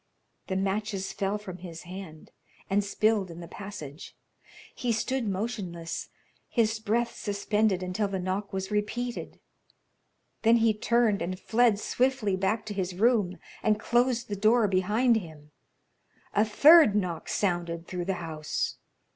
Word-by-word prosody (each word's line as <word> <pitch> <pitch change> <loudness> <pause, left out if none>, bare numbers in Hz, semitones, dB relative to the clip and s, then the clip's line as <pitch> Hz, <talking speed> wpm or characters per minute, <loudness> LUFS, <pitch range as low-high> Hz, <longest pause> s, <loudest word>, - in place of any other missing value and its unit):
The 190 - -2
matches 195 0 -1
fell 200 0 -1
from 190 -4 -8
his 170 -2 -9
hand 180 -3 -9 0.4
and 205 +1 +3
spilled 205 -1 +1
in 170 0 -9
the 170 - -8
passage. 180 -7 -9 0.6
He 245 - -1
stood 235 +2 -1
motionless, 190 -5 -4 0.4
his 225 -2 +1
breath 230 +2 0
suspended 205 -1 0
until 185 +3 -1
the 195 -1 -3
knock 190 +2 -3
was 190 +1 -4
repeated. 230 +4 -3 1.0
Then 230 +1 +5
he 225 -1 +3
turned 220 -1 +2
and 185 +1 -3
fled 230 -1 +3
swiftly 250 -5 +1
back 195 +4 0
to 215 - -5
his 185 -2 -3
room, 210 -3 +2 0.2
and 215 -1 +2
closed 240 +1 +1
the 205 - -3
door 215 +2 +4
behind 210 +6 +3
him. 155 -6 -9 0.8
A 210 - +4
third 285 +2 +7
knock 180 -5 -2
sounded 175 -3 -1
through 180 -1 -4
the 190 0 -1
house. 155 -1 -3
205 Hz, 140 wpm, -28 LUFS, 185-225 Hz, 1.0 s, third